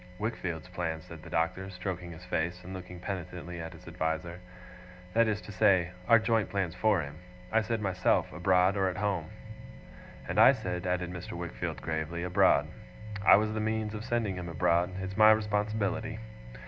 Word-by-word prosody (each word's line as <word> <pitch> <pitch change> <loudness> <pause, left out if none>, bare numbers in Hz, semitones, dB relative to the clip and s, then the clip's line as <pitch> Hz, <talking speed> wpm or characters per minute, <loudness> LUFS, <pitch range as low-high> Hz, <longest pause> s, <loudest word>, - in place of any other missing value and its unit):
'Wickfield's 90 -6 -3
plans,' 80 -3 -3
said 85 -2 -11
the - - -11
Doctor, 90 +4 -1
stroking 90 -1 -5
his 85 +2 -11
face, 85 +1 -2
and 95 +2 -8
looking 90 -1 -8
penitently 90 -2 -5
at 80 - -7
his - - -14
adviser. 80 +2 -3 0.7
'That 115 0 +4
is 105 -1 0
to - - -10
say, 90 -2 +3 0.2
our 115 - +8
joint 110 -2 +1
plans 95 -4 -1
for 100 -2 +2
him. 70 +2 -9 0.3
I 110 +1 +4
said 110 0 -2
myself, 95 -2 +1
abroad 90 +2 +3
or 95 -1 +2
at 90 - -5
home.' 95 -6 -1 1.0
'And - - 0
I - - +9
said' 90 0 -4
added 90 -1 -1
Mr. 90 0 -7
Wickfield 85 -1 -5
gravely, 80 +1 -3
'abroad. 90 0 +4 0.6
I - - +9
was 110 +1 +1
the 110 - -2
means 110 0 -1
of 105 0 -5
sending 115 -5 -1
him 90 -1 -5
abroad. 85 +2 +2
It's 95 +1 -5
my 110 0 +8
responsibility. 110 0 +1
90 Hz, 175 wpm, -30 LUFS, 85-105 Hz, 1.0 s, I